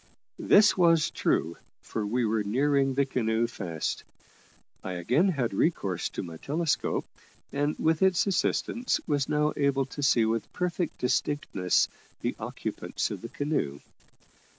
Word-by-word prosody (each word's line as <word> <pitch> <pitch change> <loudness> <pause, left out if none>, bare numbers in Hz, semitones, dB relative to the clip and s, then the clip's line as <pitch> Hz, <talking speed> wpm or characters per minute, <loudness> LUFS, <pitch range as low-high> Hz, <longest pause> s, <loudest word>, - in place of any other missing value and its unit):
This 205 0 +5
was 165 -4 +4
true, 85 +1 0 0.3
for 110 - -3
we 120 +4 0
were 110 -1 +1
nearing 135 +5 +1
the 140 0 +3
canoe 115 -3 0
fast. 90 -9 -4 0.8
I 95 - -4
again 125 - +2
had 130 - -1
recourse 100 - 0
to - - -5
my 85 -2 -8
telescope, 155 - -1 0.5
and, 145 +2 -1
with 160 0 +1
its 190 -2 +4
assistance, 235 +5 0
was 145 -4 0
now 150 0 +2
able 140 -1 +1
to 140 +2 -8
see 120 -4 +4
with 110 -1 -1
perfect 180 -1 -2
distinctness 125 -7 +1 0.3
the - - -1
occupants - - -4
of - - -5
the - - -7
canoe. 145 - -2
135 Hz, 140 wpm, -28 LUFS, 110-155 Hz, 0.8 s, This